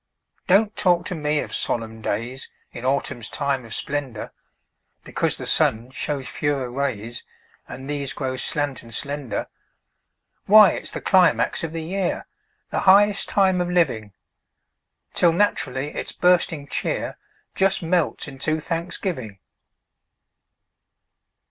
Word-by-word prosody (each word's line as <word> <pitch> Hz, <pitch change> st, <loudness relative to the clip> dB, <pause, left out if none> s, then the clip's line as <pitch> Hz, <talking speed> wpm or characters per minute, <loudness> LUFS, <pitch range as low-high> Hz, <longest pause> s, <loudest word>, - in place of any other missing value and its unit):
Don't 205 Hz, +3 st, +4 dB
talk 175 Hz, -4 st, +2 dB
to -, -, -3 dB
me 150 Hz, -2 st, 0 dB
of -, -, -7 dB
solemn 110 Hz, -1 st, 0 dB
days 115 Hz, +6 st, -3 dB, 0.2 s
In 120 Hz, -, -9 dB
autumn's 130 Hz, -3 st, -1 dB
time 140 Hz, -3 st, -1 dB
of 115 Hz, -, -5 dB
splendor, 140 Hz, -6 st, -4 dB, 0.7 s
Because -, -, -1 dB
the -, -, -6 dB
sun 115 Hz, +3 st, +2 dB
shows 135 Hz, 0 st, -3 dB
fewer 140 Hz, -4 st, -2 dB
rays, 120 Hz, -4 st, -3 dB, 0.4 s
And 130 Hz, +1 st, -8 dB
these 140 Hz, -2 st, -2 dB
grow 130 Hz, 0 st, -3 dB
slant 145 Hz, +1 st, -1 dB
and 115 Hz, -, -14 dB
slender. 140 Hz, -2 st, -2 dB, 1.0 s
Why, 210 Hz, -2 st, +9 dB
it's -, -, -4 dB
the -, -, -6 dB
climax 185 Hz, -2 st, +3 dB
of 165 Hz, -, -3 dB
the 165 Hz, -1 st, -4 dB
year, 185 Hz, +2 st, -2 dB, 0.5 s
The -, -, 0 dB
highest 205 Hz, +1 st, +5 dB
time 190 Hz, -2 st, +3 dB
of 175 Hz, -, -1 dB
living! 125 Hz, -, +1 dB, 1.0 s
Till 170 Hz, -2 st, +4 dB
naturally 145 Hz, -7 st, 0 dB
its -, -, -3 dB
bursting 175 Hz, -4 st, +2 dB
cheer -, -, -2 dB, 0.3 s
Just 190 Hz, -2 st, +2 dB
melts 165 Hz, -2 st, 0 dB
into 150 Hz, +3 st, -1 dB
thanksgiving. 165 Hz, -, -3 dB
145 Hz, 125 wpm, -23 LUFS, 130-175 Hz, 1.0 s, Why